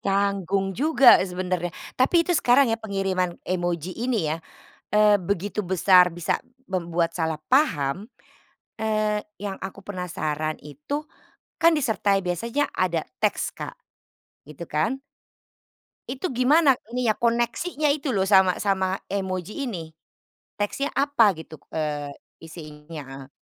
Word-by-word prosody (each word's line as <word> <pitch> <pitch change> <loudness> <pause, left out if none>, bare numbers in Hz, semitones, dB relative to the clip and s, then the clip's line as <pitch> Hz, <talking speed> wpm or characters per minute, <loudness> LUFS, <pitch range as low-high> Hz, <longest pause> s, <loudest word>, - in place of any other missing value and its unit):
Canggung 195 -1 0
juga 275 +2 +6
sebenarnya. 180 -2 -2 0.2
Tapi 335 +7 +4
itu 350 - 0
sekarang 270 -5 +4
ya 225 - 0
pengiriman 195 -4 -1
emoji 175 -1 -2
ini 225 -10 0
ya, 160 - -2 0.5
eee, 210 0 +5
begitu 200 +3 -2
besar 180 0 +5
bisa 170 -1 -2 0.2
membuat 170 -2 -1
salah 160 -2 -1
paham, 195 - +1 0.7
eee, 215 -1 0 0.2
yang 200 -1 -4
aku 195 0 -8
penasaran 155 -5 -3
itu, 150 - -5 0.5
kan 335 0 +5
disertai 210 -9 +1
biasanya 225 - -1
ada 170 -3 +1 0.2
teks - - 0
Kak, - - -6 0.7
gitu 155 +3 -8
kan? 165 - -1 1.1
Itu 275 +8 -3
gimana 270 +2 +4 0.2
nih 250 -2 +1
ya - - +4
koneksinya 240 +7 0
itu 280 -2 0
loh 190 -2 +1
sama 190 -2 +5
sama 190 -1 0
emoji 190 - -3
ini? 175 -10 -5 0.7
Teksnya 275 +8 -1
apa 275 -7 +4
gitu, 160 0 -10 0.2
eee, 150 -2 -3 0.3
isinya? 155 -1 -9
Heeh. 135 0 -10
195 Hz, 125 wpm, -24 LUFS, 170-235 Hz, 1.1 s, juga